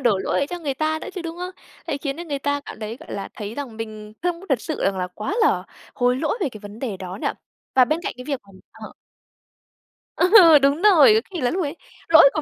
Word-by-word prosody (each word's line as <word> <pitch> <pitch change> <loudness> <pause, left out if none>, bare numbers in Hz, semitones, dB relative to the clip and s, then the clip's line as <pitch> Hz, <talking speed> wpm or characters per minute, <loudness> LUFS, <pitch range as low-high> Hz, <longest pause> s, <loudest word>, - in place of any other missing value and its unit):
đổ 235 -7 +2
lỗi - - -2
ấy 280 - +1
cho 355 - -5
người 290 -5 -3
ta 310 +2 0
nữa - - -7
chứ, 365 - -5
đúng 330 0 -6
hông? 360 +1 -5 0.4
Đấy, 280 - -2
khiến 280 -1 -3
cho 345 - -6
người 285 -4 -3
ta 285 +1 -1
cảm 280 - -10
thấy, 220 +2 -5
gọi - - -11
là, 200 - -5
thấy 210 +1 -6
rằng 265 -5 -6
mình 215 -1 -7
không 350 -1 -1
có 390 - -12
thật 265 -6 +1
sự 315 - -4
rằng 195 -1 +1
là 180 - -1
quá 215 - -3
là 440 - +3 0.3
hối 250 0 +2
lỗi 310 - -1
về 360 - +1
cái 220 - -11
vấn 205 +1 -10
đề 230 -7 -4
đó 185 +1 -7
nhỉ. - - +1 0.5
Và 255 - +7
bên 310 +6 -1
cạnh - - -3
cái 250 - -9
việc 280 -4 -3
mà - - -26 0.2
ờ. - - -10 1.2
Ờ, 355 -5 +8
đúng 280 +4 +2
rồi, 345 - +7
có 220 - +3
khi 350 -5 -4
là 245 - +1
lúc 370 0 -1
ấy 290 +1 -4 0.3
lỗi 320 -3 +8
của 310 - -1
280 Hz, 265 wpm, -22 LUFS, 225-330 Hz, 1.2 s, Ờ